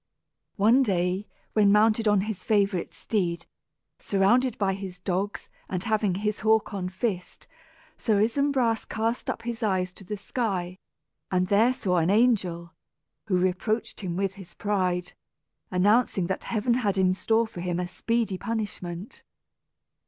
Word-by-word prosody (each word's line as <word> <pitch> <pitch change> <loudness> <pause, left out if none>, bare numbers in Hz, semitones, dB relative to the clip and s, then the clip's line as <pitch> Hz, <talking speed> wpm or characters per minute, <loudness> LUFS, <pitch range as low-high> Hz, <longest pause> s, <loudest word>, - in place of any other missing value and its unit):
One 225 +6 +5
day 185 -3 0 0.3
when 205 -2 +5
mounted 215 +1 +4
on 205 -2 +4
his 200 -2 -4
favorite 200 -4 +1
steed, 170 -6 -2 0.5
surrounded 235 +6 +2
by 195 -2 +1
his 190 -2 -6
dogs, 190 +3 -3 0.2
and 185 -1 -2
having 215 -4 +1
his 210 +2 -1
hawk 220 -1 +2
on 185 -2 -3
fist, 185 -1 -3 0.5
Sir 215 -3 +2
Isumbras 240 0 +2
cast 225 +2 -1
up 230 - -3
his 235 -1 -4
eyes 185 -4 0
to 195 - -15
the 210 +3 -5
sky, 190 -4 -3 0.5
and 185 0 +1
there 220 +5 +5
saw 185 -8 0
an 165 +1 +2
angel, 190 -6 +2 0.5
who 185 -4 +2
reproached 185 +5 -1
him 180 -4 -4
with 195 0 0
his 190 -2 -12
pride, 180 -3 -1 0.6
announcing 200 +1 +3
that 190 +2 -3
Heaven 235 +1 0
had 210 -5 0
in 185 -1 +3
store 225 +4 +2
for 200 -6 -8
him 175 -1 -2
a 180 - -2
speedy 220 +1 -1
punishment. 205 -4 -5
200 Hz, 145 wpm, -26 LUFS, 185-220 Hz, 0.6 s, One